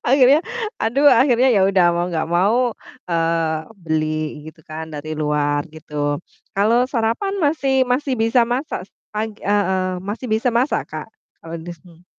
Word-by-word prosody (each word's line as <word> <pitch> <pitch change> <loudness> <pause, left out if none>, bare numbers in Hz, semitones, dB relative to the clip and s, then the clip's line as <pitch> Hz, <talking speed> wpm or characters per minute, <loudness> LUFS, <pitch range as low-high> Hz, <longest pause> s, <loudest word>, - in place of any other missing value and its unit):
akhirnya 270 +2 +6 0.4
aduh 270 +6 +2
akhirnya 260 -2 +5
ya 195 - +4
udah 190 -2 +4
mau 175 +1 0
gak 160 -1 -1
mau, 185 +7 +3 0.5
eee, 165 -1 +1 0.3
beli 155 -1 -2
gitu 160 - -23
kan 155 +1 -6
dari 155 +1 -5
luar 150 -1 0
gitu. 150 -2 -3 0.4
Kalau 225 +5 +3
sarapan 235 - 0
masih 275 -4 +2
masih 260 +2 0
bisa 230 +2 +3
masak 245 -1 -3
s - - -44 0.2
pag 215 +1 -1
heeh, 190 -2 +1 0.2
masih 205 +6 -5
bisa 220 +2 +1
masak, 240 +4 +1
Kak, - - -6 0.3
kalau 165 0 -8
di 170 +2 -8
sini. 170 0 -18
195 Hz, 155 wpm, -20 LUFS, 160-245 Hz, 0.5 s, akhirnya